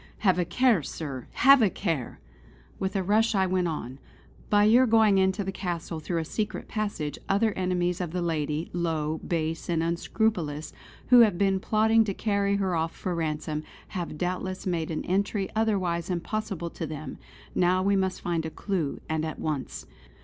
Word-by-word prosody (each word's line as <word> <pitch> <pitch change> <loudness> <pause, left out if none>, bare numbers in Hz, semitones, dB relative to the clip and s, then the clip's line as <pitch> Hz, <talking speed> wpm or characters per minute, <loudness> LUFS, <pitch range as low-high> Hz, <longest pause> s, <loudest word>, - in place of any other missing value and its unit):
Have 185 -2 +4
a 175 - +1
care, 250 -6 +3
sir! 135 -3 -6
Have 275 0 +7
a 215 - +5
care!" 165 - -3 0.6
With 190 0 -2
a 195 - +1
rush 215 +3 +2
I 190 -1 +3
went 185 -1 +1
on: 135 -5 -5 0.5
"By 205 0 +5
your 240 +5 +6
going 220 -3 +5
into 190 +2 +2
the 195 - -3
castle 175 -3 -4
through 170 +2 -3
a 165 - -1
secret 210 +5 -3
passage, 200 -9 -3
other 215 +3 +3
enemies 180 -1 0
of 175 - -2
the 175 +2 -2
lady, 155 -1 -2
low, 160 -3 -1
base 165 -1 -3
and 165 -1 +1
unscrupulous 170 -2 -1 0.4
who 250 - +8
have 215 -6 +5
been 195 0 +2
plotting 220 +3 +3
to 200 -3 -3
carry 200 -2 +1
her 195 -2 0
off 165 0 -1
for 185 - -3
ransom, 155 -2 -2 0.3
have 175 -5 -5
doubtless 185 +2 -3
made 170 -4 -1
an 160 - -3
entry 195 +1 0
otherwise 185 -6 0
impossible 180 -1 -3
to 165 - -5
them. 150 -2 -7 0.3
Now 185 +1 +2
we 200 +1 +3
must 190 -1 0
find 170 -2 -1
a 160 - -3
clue, 170 -4 -3
and 160 0 -1
at 160 -1 -4
once. 150 -4 -4
180 Hz, 180 wpm, -27 LUFS, 160-200 Hz, 0.6 s, who